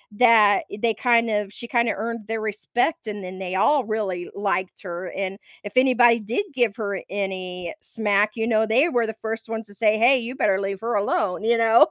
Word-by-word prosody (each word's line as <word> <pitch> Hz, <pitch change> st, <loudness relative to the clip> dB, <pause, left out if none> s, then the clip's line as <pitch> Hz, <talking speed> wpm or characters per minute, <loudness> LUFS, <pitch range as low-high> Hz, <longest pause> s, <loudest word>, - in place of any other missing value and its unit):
that 215 Hz, -4 st, +5 dB, 0.2 s
they 230 Hz, -1 st, +2 dB
kind 235 Hz, -1 st, +2 dB
of 210 Hz, -2 st, -1 dB
she 235 Hz, -, -9 dB
kinda 235 Hz, -2 st, +1 dB
earned 225 Hz, 0 st, -5 dB
their 225 Hz, 0 st, -2 dB
respect, 230 Hz, -, -2 dB
and 205 Hz, -2 st, -5 dB
then 185 Hz, +1 st, -8 dB
they 185 Hz, 0 st, -4 dB
all 275 Hz, +7 st, +3 dB
really 200 Hz, -5 st, -3 dB
liked 195 Hz, -2 st, -2 dB
her. 175 Hz, 0 st, -6 dB
And 195 Hz, 0 st, -4 dB, 0.3 s
if 205 Hz, -, -8 dB
anybody 245 Hz, -2 st, +5 dB
did 235 Hz, -, -2 dB
give 240 Hz, -6 st, +1 dB
her 200 Hz, -3 st, -3 dB
any 185 Hz, -3 st, -4 dB
smack, 210 Hz, -1 st, +1 dB
you 225 Hz, 0 st, -1 dB
know, 220 Hz, -1 st, +2 dB
they 260 Hz, +10 st, +3 dB
were 235 Hz, -5 st, +1 dB
the 220 Hz, -, -4 dB
first 225 Hz, 0 st, -6 dB
ones 225 Hz, -1 st, -5 dB
to 205 Hz, -, -15 dB
say, 215 Hz, 0 st, +2 dB
"Hey, 245 Hz, +4 st, +5 dB
you 245 Hz, +2 st, -6 dB
better 195 Hz, -4 st, +1 dB
leave 195 Hz, -1 st, -3 dB
her 230 Hz, -1 st, -1 dB
alone." 200 Hz, -1 st, 0 dB
You 230 Hz, +1 st, +3 dB
know? 230 Hz, +7 st, +6 dB
220 Hz, 205 wpm, -23 LUFS, 200-235 Hz, 0.3 s, know